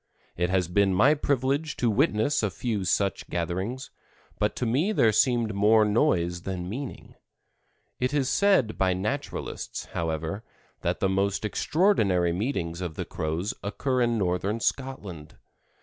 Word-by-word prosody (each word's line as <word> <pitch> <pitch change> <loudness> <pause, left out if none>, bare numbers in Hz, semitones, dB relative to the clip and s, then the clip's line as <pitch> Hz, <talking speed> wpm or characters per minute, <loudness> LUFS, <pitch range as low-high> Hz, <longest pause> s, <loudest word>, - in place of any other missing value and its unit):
It 90 +1 0
has 95 -2 +1
been 95 +1 +2
my 130 +10 +5
privilege 140 +1 0
to 120 - +1
witness 110 +4 +2
a 105 - +1
few 105 -1 -3
such 95 +1 0
gatherings, 95 +10 -3 0.5
but 105 0 +1
to 125 - -2
me 140 - +1
there 115 - +4
seemed 120 -1 +2
more 105 +2 +4
noise 90 - +1
than 90 -1 -4
meaning. 125 +7 -6 0.9
It 125 +1 0
is 145 -3 +1
said 190 - +2
by 95 -1 +3
naturalists, 110 +10 -4
however, 80 +5 -3 0.4
that - - -1
the 95 - +3
most 100 +2 0
extraordinary 105 - +2
meetings 90 -5 -2
of 85 -4 -4
the - - -4
Crows 80 +6 -3
occur 130 +5 -1
in 120 -1 +2
northern 95 +3 0
Scotland. 105 - -4
105 Hz, 145 wpm, -27 LUFS, 90-130 Hz, 0.9 s, my